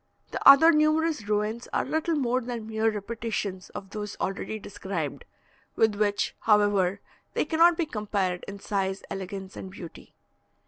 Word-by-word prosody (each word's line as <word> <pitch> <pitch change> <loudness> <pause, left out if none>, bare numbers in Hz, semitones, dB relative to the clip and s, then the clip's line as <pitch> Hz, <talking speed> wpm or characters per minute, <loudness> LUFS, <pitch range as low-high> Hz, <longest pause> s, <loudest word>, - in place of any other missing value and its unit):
The - - -4
other 320 +4 +9
numerous 310 -4 +2
ruins 215 +3 -1
are - - +1
little 320 +1 0
more 255 -3 +1
than 235 -2 -5
mere 220 0 +1
repetitions 210 -3 -4
of 195 -1 -9
those 210 -1 -5
already 195 +3 -3
described, 195 -7 -5 0.5
with 220 -1 +3
which, 205 0 0
however, 205 -3 +3 0.3
they - - +1
cannot 335 +1 +4
be 335 - +1
compared 200 - -2
in 200 0 -7
size, 195 -1 -2
elegance, 190 0 -6
and 190 - -7
beauty. 180 -3 -11
210 Hz, 145 wpm, -27 LUFS, 195-240 Hz, 0.5 s, other